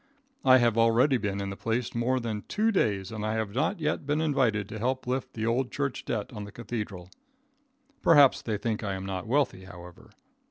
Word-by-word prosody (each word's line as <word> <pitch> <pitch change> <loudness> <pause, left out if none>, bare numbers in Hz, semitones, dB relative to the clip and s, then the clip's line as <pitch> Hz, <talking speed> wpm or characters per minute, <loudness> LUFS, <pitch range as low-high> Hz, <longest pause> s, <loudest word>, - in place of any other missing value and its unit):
I 130 -2 +7
have 120 -2 +2
already 115 +4 +4
been 100 -3 -2
in 100 0 -3
the - - -5
place 115 +3 -2
more 125 +2 +1
than 110 -3 -3
two 220 +2 +1
days 100 - 0
and 110 -1 -5
I 110 +1 -1
have 110 -2 -2
not 160 - 0
yet 155 -1 -1
been 145 +2 0
invited 130 -10 +1
to 110 - -6
help 130 +3 -1
lift 130 +1 -3
the 110 -1 -2
old 120 +3 0
church 140 -1 -3
debt 110 0 -3
on 105 -2 -6
the 105 - -9
cathedral. 100 -6 -6 0.9
Perhaps 145 -5 +6
they 110 -2 -2
think 110 0 -2
I 100 -2 -2
am 95 0 -6
not 95 0 -4
wealthy, 125 -7 0
however. 90 -2 -12
115 Hz, 205 wpm, -28 LUFS, 105-130 Hz, 0.9 s, I